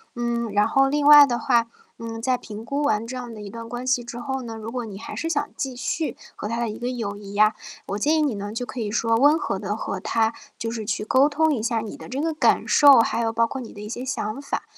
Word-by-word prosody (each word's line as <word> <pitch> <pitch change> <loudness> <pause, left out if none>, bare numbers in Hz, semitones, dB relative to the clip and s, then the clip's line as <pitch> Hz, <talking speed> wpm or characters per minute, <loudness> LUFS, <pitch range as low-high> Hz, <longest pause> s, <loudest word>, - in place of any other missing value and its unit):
嗯， 235 -2 -2
然 205 +1 +3
后 270 0 +3
另 290 0 +1
外 295 -1 +10
的 240 -3 -2
话， 235 -3 +2 0.3
嗯， 225 0 -6
在 255 +1 +1
评 215 0 -9
估 285 +3 -2
完 225 -5 +1
这 255 - -6
样 245 -2 -6
的 215 - -9
一 200 - -7
段 230 +1 -8
关 245 +1 -5
系 250 -2 +2
之 240 0 -7
后 265 +1 -3
呢， 230 -2 -7
如 220 +1 -7
果 245 -2 -3
你 200 -2 -8
还 - - -8
是 330 - -3
想 290 -3 -1
继 270 -3 -3
续 310 +5 -3 0.2
和 210 - -5
他 230 +1 -2
的 235 - 0
一 210 - -6
个 245 +1 -2
友 225 -5 -4
谊 200 -1 -10
呀， 215 +1 +4 0.3
我 200 - -2
建 300 +9 +2
议 310 - +2
你 275 -8 0
呢 205 +1 -5
就 245 +2 -4
可 250 - -7
以 205 -1 -3
说 230 0 +1
温 290 +6 +5
和 195 - -2
地 205 0 -3
和 200 -3 -4
他 225 +1 +1 0.3
就 225 - -3
是 220 -2 -5
去 210 0 -2
沟 265 +5 +4
通 315 +1 +2
一 220 - -4
下 230 -1 0
你 220 -1 -6
的 - - -11
这 265 +2 -3
个 325 0 0
感 305 - +2
受， 285 -4 +7
还 230 - +1
有 225 -1 0
包 230 0 +2
括 265 +1 -5
你 235 - -9
的 205 - -11
一 210 - -7
些 245 +3 -5
想 255 -1 -3
法。 - - -3
235 Hz, 305 characters per minute, -23 LUFS, 220-265 Hz, 0.3 s, 外